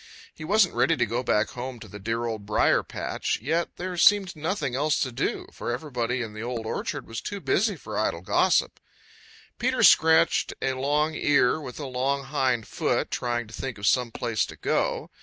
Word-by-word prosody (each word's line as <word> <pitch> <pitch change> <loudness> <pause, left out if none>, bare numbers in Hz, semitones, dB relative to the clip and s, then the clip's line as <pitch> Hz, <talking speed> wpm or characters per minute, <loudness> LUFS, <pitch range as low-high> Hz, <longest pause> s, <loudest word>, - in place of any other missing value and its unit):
He - - -10
wasn't 195 +3 +3
ready 165 - +2
to 120 - +2
go 120 +3 -2
back 105 -4 +1
home 125 0 -6
to - - -10
the 105 - -10
dear 115 +3 -2
Old 110 -3 -4
Briar 105 +1 +3
patch, - - -3
yet 160 +8 -1
there 180 0 -5
seemed 195 +1 +4
nothing 155 -4 -2
else 150 +4 +1
to 130 - -1
do, 120 - -2
for - - -4
everybody 125 -2 -2
in 110 -2 -7
the 110 - -7
Old 120 -1 -4
Orchard - - -3
was 115 0 -6
too 205 - -5
busy 200 +2 +1
for 110 -9 -5
idle 85 -6 -1
gossip. 90 - +2 0.8
Peter - - +1
scratched 160 0 +5
a 135 - 0
long 145 +4 0
ear 145 -1 +2
with 125 -2 -8
a 145 - -4
long 135 +2 -1
hind 130 -5 0
foot, - - -1
trying 120 -1 -1
to 110 - -15
think 130 -2 -5
of 100 - -5
some 125 +1 +3
place 115 -3 -1
to - - -10
go. - - -1
130 Hz, 195 wpm, -26 LUFS, 115-155 Hz, 0.8 s, scratched